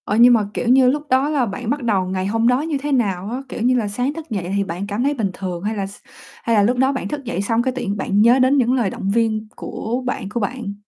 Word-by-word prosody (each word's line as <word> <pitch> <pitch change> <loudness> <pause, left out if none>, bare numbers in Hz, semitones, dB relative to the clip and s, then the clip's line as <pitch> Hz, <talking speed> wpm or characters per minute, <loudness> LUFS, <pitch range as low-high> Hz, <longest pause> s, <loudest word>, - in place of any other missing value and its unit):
Ờ, 205 - -1
nhưng 245 +1 +8
mà, 215 -4 +2
kiểu - - -3
như, 255 +1 +6
lúc 290 +3 -1
đó 265 +3 +3
là 285 -5 +1
bạn 225 +2 -5
bắt 285 0 -1
đầu 200 -5 +1
ngày 185 0 -2
hôm 225 +3 +1
đó 250 +2 +3
như 310 -2 -2
thế 290 +2 -4
nào 200 -7 0
á? 250 +3 -4
Kiểu - - -6
như 250 +2 +3
là, 230 -4 0
sáng 245 +7 -2
thức 320 -1 -9
dậy 190 -5 -3
thì 200 - +1
bạn 185 +2 -5
cảm 205 +4 -2
thấy 285 +2 +2
bình 225 -8 -1
thường 180 -2 -5
hay 215 +2 -2
là 200 -2 -2
s 200 - -12 0.5
hay 230 - +1
là 205 - +4
lúc 245 +4 +2
đó 265 +2 +3
bạn 270 - -3
thức 295 -1 -5
dậy 230 -6 -3
xong 225 +3 +1
cái 260 - 0
tự 260 - -3
nhiên 200 +1 -2
bạn 200 +1 +1
nhớ 240 +4 +5
đến 260 +2 +4
những 250 -1 +3
lời 240 -6 +1
động 195 - -4
viên 220 0 0
của 245 +4 -4
bạn 250 -5 -3
của 235 - -3
bạn? 215 -1 -3
235 Hz, 305 wpm, -20 LUFS, 200-260 Hz, 0.5 s, nhưng